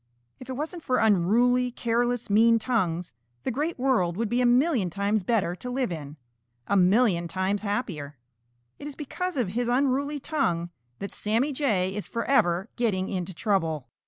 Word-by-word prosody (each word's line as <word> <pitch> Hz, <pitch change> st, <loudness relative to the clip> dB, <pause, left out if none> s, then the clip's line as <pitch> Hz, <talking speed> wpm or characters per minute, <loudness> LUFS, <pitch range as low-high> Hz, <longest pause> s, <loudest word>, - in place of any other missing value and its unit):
If 255 Hz, -, -11 dB
it -, -, -2 dB
wasn't 315 Hz, +6 st, -4 dB
for 255 Hz, -4 st, 0 dB
unruly, 225 Hz, +5 st, +3 dB
careless, 240 Hz, 0 st, -1 dB
mean 230 Hz, +2 st, +5 dB
tongues, 180 Hz, -, -1 dB, 0.3 s
the -, -, -1 dB
Great 300 Hz, +7 st, -2 dB
World 235 Hz, -10 st, +1 dB
would 225 Hz, -1 st, -1 dB
be 245 Hz, +1 st, +1 dB
a 245 Hz, -, +4 dB
million 245 Hz, -, +3 dB
times 200 Hz, +4 st, 0 dB
better 190 Hz, -4 st, 0 dB
to 250 Hz, -, -7 dB
live 250 Hz, -4 st, -1 dB
in, 150 Hz, -2 st, -7 dB, 0.5 s
a 200 Hz, -, 0 dB
million 185 Hz, -2 st, +3 dB
times 190 Hz, +3 st, -1 dB
happier. 185 Hz, -, -3 dB, 0.6 s
It 290 Hz, -, -7 dB
is 290 Hz, -, -7 dB
because 360 Hz, +4 st, -4 dB
of 240 Hz, -7 st, 0 dB
his 240 Hz, +4 st, -1 dB
unruly 280 Hz, +3 st, +1 dB
tongue 175 Hz, -, -1 dB, 0.3 s
that 200 Hz, -, -6 dB
Sammy 230 Hz, +8 st, 0 dB
Jay 205 Hz, -10 st, 0 dB
is 210 Hz, 0 st, -4 dB
forever 195 Hz, -7 st, +1 dB
getting 195 Hz, -6 st, 0 dB
into 185 Hz, -2 st, -4 dB
trouble. 160 Hz, -, -1 dB
225 Hz, 165 wpm, -26 LUFS, 185-255 Hz, 0.6 s, mean